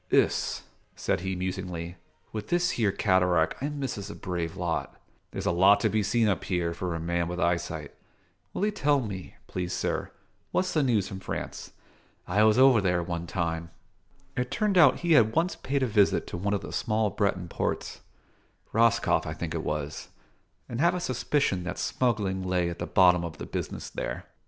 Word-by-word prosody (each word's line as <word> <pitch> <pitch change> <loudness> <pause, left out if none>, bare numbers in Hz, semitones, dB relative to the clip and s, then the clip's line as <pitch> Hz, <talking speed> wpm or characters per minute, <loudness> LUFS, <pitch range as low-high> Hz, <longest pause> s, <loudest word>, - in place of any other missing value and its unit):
"Iss," - - +2 0.3
said - - 0
he 95 +1 -3
musingly, 90 -2 -4 0.4
"with 105 -1 -5
this 175 0 +2
here 105 -4 +1
cataract 90 -3 +2
I 140 - -1
misses 135 -9 -4
a - - -7
brave 85 -3 -4
lot. 85 -2 -3 0.3
There's - - -5
a - - +3
lot 95 +4 +5
to - - +3
be 110 - +1
seen 110 +2 +2
up 100 - 0
here, 85 -2 0
for 85 0 -3
a - - -3
man 85 +1 -1
with 90 0 -4
eyesight. 85 -4 -1 0.6
Will 200 - -1
'ee 210 - +1
tell 145 -7 +2
me, 100 -7 -6
please 90 -1 -4
sir, - - -2 0.4
what's 185 - 0
the 155 - +3
news 115 -8 +2
from 95 - -6
France? 95 - -6 0.5
I 100 +4 +2
was 110 +1 +5
over 130 -4 +6
there, 90 -2 +1
one 85 0 -4
time." 85 -2 -2 0.7
It 125 0 -1
turned 205 +8 0
out 160 -7 +6
he 170 -1 0
had 115 -8 +5
once 170 +4 +1
paid 140 0 -1
a - - +2
visit 105 -3 +3
to - - -6
one 100 +3 0
of 100 - -2
the - - -8
small 110 -2 0
Breton 95 -3 0
ports: - - -3 0.7
Roscoff 115 -6 +3
I 80 - -3
think 80 +1 -4
it 80 -1 -3
was, 75 0 -3 0.6
and 120 +2 -3
have 170 +2 +4
a - - -1
suspicion 130 - 0
that 90 - -4
smuggling 105 -7 0
lay 90 -2 0
at 85 - -8
the - - -3
bottom 90 -2 +5
of 80 -3 -6
the - - -6
business - - -5
there. - - -5
95 Hz, 190 wpm, -28 LUFS, 85-120 Hz, 0.7 s, over